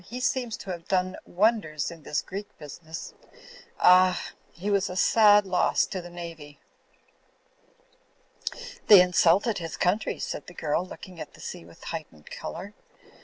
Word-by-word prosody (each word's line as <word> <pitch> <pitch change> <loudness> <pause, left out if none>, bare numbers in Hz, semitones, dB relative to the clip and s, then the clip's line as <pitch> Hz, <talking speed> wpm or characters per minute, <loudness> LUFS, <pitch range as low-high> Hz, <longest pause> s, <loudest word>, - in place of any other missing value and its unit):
"He 245 +6 -7
seems 250 -3 -1
to 190 - -7
have 170 -2 -7
done 185 -1 0
wonders 180 -7 +1
in 165 -1 -11
this 150 0 -2
Greek 200 +2 -8
business. 160 +2 -9 0.7
Ah! 185 0 +5 0.2
He 195 +5 -4
was 200 -1 +1
a 180 - -6
sad 210 +1 +5
loss 185 -1 +2
to 185 - -5
the 175 - -10
Navy!" 165 -4 -9 2.3
"They 205 -3 +10
insulted 180 +4 +3
his 165 -2 -6
country," 190 +5 0
said - - -5
the 175 - -12
girl, 155 +2 -1
looking 185 -1 -11
at - - -9
the - - -17
sea 85 - -7
with 85 - -16
a - - -11
heightened 155 - -8
colour. 195 +4 -7
180 Hz, 155 wpm, -27 LUFS, 165-200 Hz, 2.3 s, They